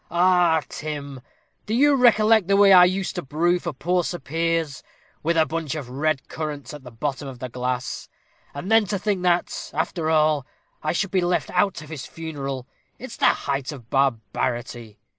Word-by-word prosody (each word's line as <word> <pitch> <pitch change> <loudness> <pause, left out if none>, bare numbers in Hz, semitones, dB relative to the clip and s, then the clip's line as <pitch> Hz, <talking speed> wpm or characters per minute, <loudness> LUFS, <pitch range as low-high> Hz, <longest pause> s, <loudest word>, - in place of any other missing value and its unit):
"Ah, 175 -2 +3
Tim, 140 -3 -6 0.5
do 215 - 0
you 290 +4 +5
recollect 225 -5 +4
the 200 0 +3
way 200 -1 +7
I 180 -1 +9
used 190 +1 -1
to - - -1
brew 170 +5 +1
for 170 - -4
poor 175 +6 0
Sir 175 - -3
Piers, 165 0 -2 0.4
with 165 +2 0
a 160 - +5
bunch 160 -2 -3
of 135 -5 -6
red 145 +1 -1
currants 150 -4 -5
at 150 - -9
the 125 - -9
bottom 135 +4 -4
of 130 -2 -8
the 130 +1 -6
glass? 125 +1 -4 0.5
And 175 +9 -5
then 225 -1 +5
to 200 +1 -1
think 200 -1 -1
that, 180 -1 0
after 165 -3 -1
all, 155 -3 +2 0.3
I 155 - 0
should 185 +3 -1
be 185 -1 +2
left 175 0 0
out 180 -2 +1
of 150 - -13
his 150 -5 -6
funeral 140 -5 -5 0.3
it's - - -8
the - - +4
height 140 0 0
of 125 -5 -12
barbarity. 120 -3 -1
155 Hz, 185 wpm, -23 LUFS, 135-180 Hz, 0.5 s, I